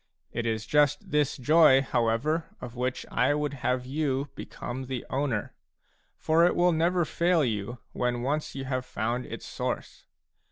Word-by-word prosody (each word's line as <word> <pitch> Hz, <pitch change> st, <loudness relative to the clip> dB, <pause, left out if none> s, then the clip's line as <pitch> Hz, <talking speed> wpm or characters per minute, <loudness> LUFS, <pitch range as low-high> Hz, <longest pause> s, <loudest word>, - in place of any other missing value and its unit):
It 120 Hz, 0 st, -2 dB
is 110 Hz, -1 st, -1 dB
just 145 Hz, +3 st, +2 dB
this 150 Hz, -2 st, +1 dB
joy, 135 Hz, 0 st, +6 dB
however, 130 Hz, +7 st, 0 dB
of 125 Hz, -1 st, -8 dB
which 125 Hz, +1 st, -2 dB
I 145 Hz, -, +2 dB
would 150 Hz, -1 st, -1 dB
have 125 Hz, 0 st, 0 dB
you 140 Hz, 0 st, -1 dB
become 130 Hz, +2 st, -6 dB
the 130 Hz, -2 st, -4 dB
owner; 130 Hz, -6 st, -1 dB, 0.6 s
for 160 Hz, +2 st, +3 dB
it 175 Hz, -, +4 dB
will 175 Hz, 0 st, +4 dB
never 170 Hz, +2 st, +2 dB
fail 170 Hz, -2 st, +2 dB
you 115 Hz, +1 st, -3 dB
when 120 Hz, -1 st, -1 dB
once 150 Hz, +3 st, -2 dB
you 135 Hz, -1 st, -4 dB
have 130 Hz, -1 st, -2 dB
found 120 Hz, +1 st, -3 dB
its -, -, -7 dB
source. -, -, -4 dB
135 Hz, 160 wpm, -28 LUFS, 120-150 Hz, 0.6 s, joy